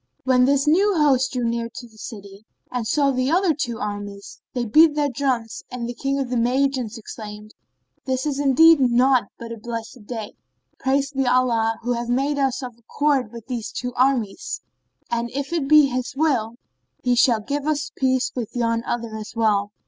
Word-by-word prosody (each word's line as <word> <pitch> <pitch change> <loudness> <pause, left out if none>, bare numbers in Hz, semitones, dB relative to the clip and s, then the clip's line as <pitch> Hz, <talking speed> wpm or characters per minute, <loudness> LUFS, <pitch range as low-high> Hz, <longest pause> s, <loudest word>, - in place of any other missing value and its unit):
When 250 -1 +4
this 280 +1 +2
new 385 +6 +4
host 265 -4 +3
drew 250 -1 -1
near 230 0 -2
the 240 - -10
city 205 -2 -10 0.3
and 245 -3 -2
saw 280 +3 +2
the 310 +7 +2
two 240 -5 -3
other - - -5
armies, 205 -1 -8
they 245 -1 -1
beat 305 +7 +5
their 290 -2 +1
drums 245 -4 -2
and 250 -2 -5
the 240 - -4
King 275 +3 -2
of 265 -3 -3
the 250 - +1
Magians 250 -1 0
exclaimed, 210 -1 -9 0.5
"This 260 0 -1
is 285 -2 -1
indeed 290 +3 +6
naught 255 -1 +4
but 230 0 -8
a 230 - -7
blessed 230 -1 -7
day. 225 -4 -5 0.5
Praised 275 +1 0
be 270 -1 +1
Allah 235 -3 +2
who 245 +1 0
hath 235 0 -3
made 275 +4 +1
us 265 -1 0
of 245 -2 -7
accord 265 0 0
with 235 -2 -10
these 245 -4 -4
two 250 0 -4
armies; 255 - 0 0.5
and 235 0 -1
if 280 +4 -3
it 315 -5 0
be 300 0 +7
His 255 +1 -3
will, 255 -7 +1 0.5
He 250 - +2
shall 240 -2 +4
give 280 +7 -3
us 290 -2 -1
peace 260 -1 +1
with 240 -3 -5
yon 230 -1 0
other 230 -2 -3
as 215 -1 -7
well." 210 -3 +2
250 Hz, 185 wpm, -22 LUFS, 230-275 Hz, 0.5 s, be